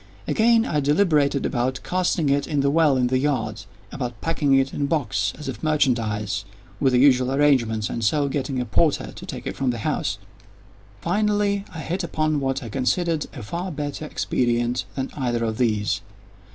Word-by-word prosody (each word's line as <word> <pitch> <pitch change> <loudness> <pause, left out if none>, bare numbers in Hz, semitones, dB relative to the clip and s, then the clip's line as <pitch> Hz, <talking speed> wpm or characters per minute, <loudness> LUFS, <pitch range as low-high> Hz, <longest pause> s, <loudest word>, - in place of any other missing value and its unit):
Again, 230 0 +4
I 150 - 0
deliberated 145 -2 +2
about 130 0 -1
casting 180 -4 0
it 140 0 +1
in 145 -2 0
the 140 0 +2
well 155 -3 +4
in 125 - +2
the 130 +1 +1
yard—about 120 -3 -4
packing 150 -4 +1
it 135 0 +2
in - - -4
a - - +2
box, 145 -3 0
as 150 - -8
if 120 -5 -5
merchandise, 115 -9 0 0.4
with 135 -2 +2
the 125 - +4
usual 130 -1 +4
arrangements, 130 -7 +2
and 115 - -4
so 145 +7 +2
getting 135 -1 -2
a 125 - -1
porter 120 - +1
to - - -10
take - - -6
it - - -4
from 135 -2 0
the 120 - -1
house. 150 -8 -1 0.8
Finally 205 +1 +1
I 165 -3 -7
hit 180 +4 -3
upon 155 -2 0
what 135 0 -1
I 115 - -6
considered 155 - 0
a 125 - -7
far 175 - -4
better 145 0 -4
expedient 120 -4 0
than 135 -1 -3
either 120 -4 -1
of 110 0 -2
these. 105 -6 +1
135 Hz, 180 wpm, -23 LUFS, 120-155 Hz, 0.8 s, Again